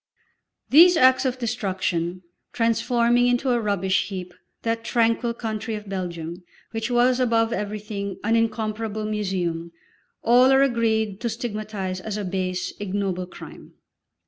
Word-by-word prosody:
These 340 +5 +8
acts 260 -1 +5
of 255 -1 0
destruction, 185 -6 -2 0.3
transforming 235 +1 +2
into 245 +2 +1
a 240 -1 +2
rubbish 195 -3 0
heap 185 -3 -6 0.3
that 230 0 -1
tranquil 230 0 +1
country 220 -1 -4
of 210 -1 -8
Belgium, 175 -2 -5 0.3
which 225 +1 -3
was 245 +1 +3
above 230 -2 +2
everything 205 -2 -4
an 225 +2 +2
incomparable 220 -1 -1
museum, 185 -6 -2 0.5
all 250 +3 +6
are 270 0 +6
agreed 220 -5 0
to 235 - -1
stigmatise 215 -5 -4
as 210 +2 -5
a 205 - -3
base, 185 -1 -2
ignoble 195 -2 -2
crime. - - -12
215 Hz, 130 wpm, -24 LUFS, 190-235 Hz, 0.5 s, These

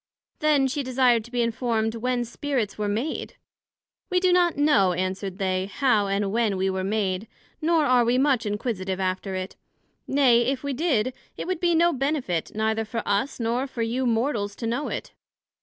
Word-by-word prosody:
Then 300 -3 +3
she 275 +2 -2
desired 250 -3 +2
to 240 - -14
be 245 -1 +1
informed 230 -1 0
when 245 +1 -1
Spirits 240 -3 -2
were 210 -1 -2
made? 230 +10 -3 0.7
We 365 - +2
do 365 -1 +3
not 350 -3 +3
know, 210 -11 +4
answered 185 +1 -3
they, 190 -1 -1
how 215 -3 +2
and 200 0 0
when 220 -3 +1
we 190 +1 +1
were 190 0 -2
made, 195 0 -1 0.3
nor 320 -1 +3
are 250 -3 +4
we 240 +2 +2
much 260 -5 +2
inquisitive 205 -3 -2
after 190 +1 -2
it; 185 0 -5 0.5
nay, 260 -4 +4
if 270 0 -1
we 280 -1 -2
did, 255 -5 +1 0.2
it - - -4
would 370 -2 -2
be 345 -1 +2
no 340 +1 +4
benefit, 270 - -1
neither 220 +1 0
for 225 +2 -4
us, 205 +8 0
nor 240 +3 0
for 240 -3 -3
you 245 +3 -1
Mortals 225 -3 0
to 230 - -6
know 240 +6 -1
it. - - -5
235 Hz, 185 wpm, -25 LUFS, 205-270 Hz, 0.7 s, know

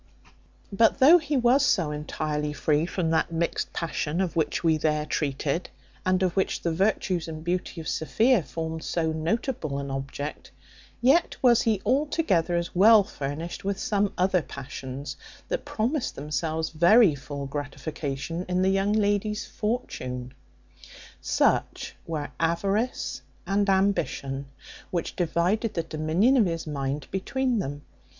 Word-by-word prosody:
But 225 +5 +4
though 295 +6 +8
he 295 -2 -1
was 255 +3 +4
so 170 - +2
entirely 150 0 -3
free 150 +3 +1
from 175 -3 -1
that 165 - +1
mixed 170 +1 -1
passion, 165 -1 -2
of 185 -3 -1
which 155 -1 0
we 160 -2 +3
there 150 -1 0
treated, 150 +3 -2 0.3
and 185 0 +2
of 180 -2 0
which 190 - 0
the 170 - +1
virtues 185 -1 0
and 155 -1 -7
beauty 180 0 -2
of 160 - -7
Sophia 225 +8 +2
formed 160 0 -5
so 160 -2 -1
notable 160 - -2
an 140 -1 -4
object; 135 +2 -5 0.5
yet 275 +8 +4
was 240 -3 +6
he 215 -4 0
altogether 255 - +1
as 170 0 -2
well 210 +3 +7
furnished 155 -2 -5
with 200 0 -1
some 205 -1 +1
other 185 0 +3
passions, 135 0 -7 0.3
that - - -2
promised 245 +6 -1
themselves 155 +3 -2
very 175 +4 +6
full 140 0 -6
gratification 145 +3 -4
in 180 +1 +1
the 190 - +3
young 195 +2 +1
lady's 210 +1 +1
fortune. 130 - -4 0.9
Such - - 0
were 155 -3 -3
avarice 195 +9 0 0.2
and 200 +1 +1
ambition, 190 -8 0 0.4
which 170 -2 -3
divided 180 +6 0
the 165 - 0
dominion 165 - +2
of 220 -6 +4
his 165 -1 -3
mind 140 -1 -3
between 250 +5 0
them. 145 -4 -4
170 Hz, 140 wpm, -26 LUFS, 150-205 Hz, 0.9 s, though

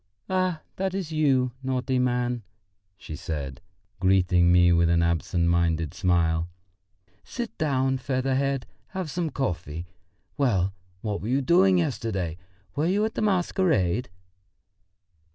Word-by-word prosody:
"Ah, 185 -3 0 0.2
that's 190 -3 -2
you, 135 -5 +2
naughty 130 0 -1
man!" 125 -1 0 0.6
she 80 - -8
said, 75 -4 -5 0.4
greeting 90 -2 +4
me 90 0 +6
with 85 0 +3
an 85 0 +3
absent 85 +1 +1
minded 85 -3 +1
smile. 85 -3 +1 0.7
"Sit 240 -2 -5
down, 135 -4 +1
feather 130 +1 -1
head, 135 -1 0 0.3
have 180 -5 -3
some 170 -1 -1
coffee. 85 - -3 0.5
Well, 100 -9 +1 0.3
what 105 -2 -3
were 105 - -5
you 135 +3 +1
doing 185 +6 +5
yesterday? 110 - -2 0.4
Were 150 +3 +1
you 205 +4 +2
at 220 - -3
the - - -3
masquerade?" 175 - +1
125 Hz, 125 wpm, -26 LUFS, -, 0.7 s, me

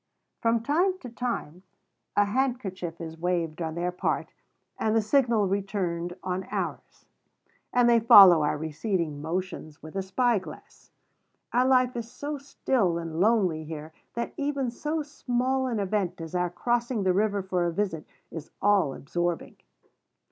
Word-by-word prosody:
From 230 0 +1
time 355 +8 +2
to 250 - -7
time 230 -9 -4 0.5
a 205 - +4
handkerchief 200 -8 -2
is 160 -1 -7
waved 170 -2 -1
on 160 -1 -3
their 175 +1 -1
part, 180 - -2 0.5
and 220 0 +1
the 225 - +4
signal 230 -3 +3
returned 185 -3 -2
on 185 +1 -2
ours; - - -5 0.7
and 245 -1 +4
they 235 -1 +6
follow 195 -7 +9
our 150 0 +1
receding 160 0 -2
motions 160 -2 -5
with 155 +3 -10
a 195 - 0
spyglass. 205 +1 -2 0.6
Our 250 +2 +3
life 255 -1 +3
is 235 -1 -4
so 290 0 -5
still 250 -9 0
and 165 -1 -5
lonely 190 -6 +2
here, 155 0 -8 0.2
that 235 - -3
even 280 -3 -1
so 300 +5 -2
small 260 -2 -1
an 235 -4 -1
event 195 -3 -1
as 165 0 -7
our 180 0 +1
crossing 240 +3 -1
the 185 -1 +3
river 200 0 +1
for 180 -2 0
a - - -1
visit 165 -4 -2 0.2
is 160 -2 -7
all 195 -9 +3
absorbing. 175 +3 -3
195 Hz, 150 wpm, -27 LUFS, 170-240 Hz, 0.7 s, follow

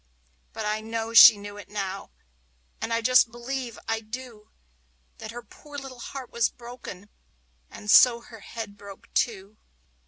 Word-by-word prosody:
But 220 - -5
I 215 +1 -1
know 225 0 -4
that 230 - +2
she 215 - +10
knew 205 0 -9
it 205 - -11
now, 195 -2 -5 0.7
and 230 - -3
I 230 0 +1
just 250 0 +5
believe, 240 0 -5
I 225 0 0
do, 225 -1 -9 0.7
That - - -8
her 240 +1 -8
poor 295 -1 -13
little 270 -3 -8
heart 260 0 -8
was 235 -2 +1
broken, 235 -5 -11 0.6
and 210 - -4
so 235 -2 +7
her 230 -1 -13
head 205 0 -8
broke 200 -1 -13
too. 210 -3 -1
225 Hz, 160 wpm, -26 LUFS, 210-240 Hz, 0.7 s, she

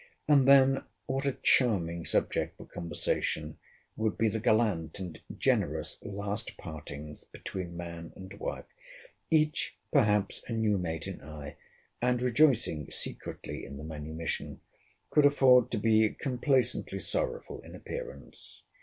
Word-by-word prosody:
And 140 -3 +5
then 135 -1 +6 0.2
what 135 +1 -1
a 135 - -1
charming 85 -9 +3
subject - - 0
for - - -10
conversation 80 -2 -2 0.4
would 110 -1 -1
be 110 0 +3
the 110 +1 -2
gallant 105 -7 +2
and 90 -5 -7 0.2
generous - - 0
last 100 +2 -4
partings 75 -2 -8
between 90 -3 -6
man 85 -1 -7
and 95 0 -9
wife! - - -4 0.6
Each, 155 -2 +2 0.2
perhaps, 105 -8 +3
a - - -1
new 110 -3 +2
mate 80 -3 -3
in - - -6
eye, 75 0 -8 0.5
and 125 0 +2
rejoicing 120 - +3
secretly - - -5
in 70 - -8
the 75 - -8
manumission, 80 +1 -5 0.5
could 150 -2 +7
afford 130 -3 +6
to 115 - -1
be 110 +1 +4
complaisantly 130 -1 0
sorrowful 475 +1 -3
in - - -11
appearance. - - -9
105 Hz, 130 wpm, -30 LUFS, 85-130 Hz, 0.6 s, could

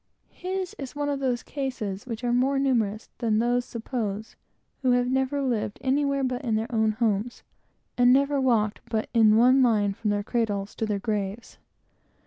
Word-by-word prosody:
His 370 0 -4
is 275 0 -7
one 290 0 -1
of 280 -1 -1
those 250 -3 -1
cases 245 -8 -4
which 230 0 -5
are 240 -1 +1
more 265 +3 +2
numerous 230 -6 0
than 225 -3 +1
those 245 +2 +1
suppose, 220 -3 -4 0.5
who 255 -2 +3
have 245 0 +2
never 265 +2 0
lived 225 -5 -1
anywhere 275 +1 +1
but 255 -1 -1
in 230 -4 0
their 225 +3 -2
own 220 -1 +2
homes, 220 +1 -1 0.6
and 245 0 +6
never 280 +1 +3
walked 225 -5 +1
but 220 -1 -1
in 220 -2 +5
one 255 +3 +5
line 210 -5 +3
from 210 +2 -3
their 205 0 0
cradles 210 -3 -2
to 220 - -1
their 210 -1 0
graves. 205 +1 -4
240 Hz, 175 wpm, -26 LUFS, 215-265 Hz, 0.6 s, and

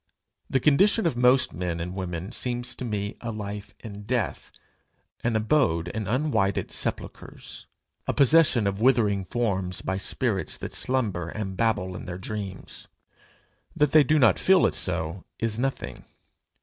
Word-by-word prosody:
The 135 - +2
condition 185 - +4
of 165 - +1
most 125 +2 +4
men 85 0 -3
and 90 +2 -4
women 90 0 -5
seems 125 -1 -2
to - - -7
me 105 -3 -3
a 115 - -4
life 105 -1 -6
in 105 -2 -8
death, 120 -2 -2 0.7
an 120 -1 +1
abode 110 - +2
in 110 +3 -4
unwhited 115 - 0
sepulchres, - - -4 0.4
a - - +1
possession 140 -5 +5
of 100 +1 -1
withering 110 -6 +3
forms 95 -3 -1
by 95 +1 -2
spirits 100 0 -1
that - - -7
slumber, 105 -10 -1
and 95 0 -5
babble 95 -4 0
in - - -7
their 90 0 -5
dreams. 100 -1 -6 0.9
That 150 -2 +2
they 155 0 +7
do 155 +3 +2
not 125 -6 +4
feel 190 -1 +5
it - - +1
so, 85 0 -1
is 115 0 -2
nothing. 135 +1 -3
110 Hz, 150 wpm, -26 LUFS, 95-125 Hz, 0.9 s, they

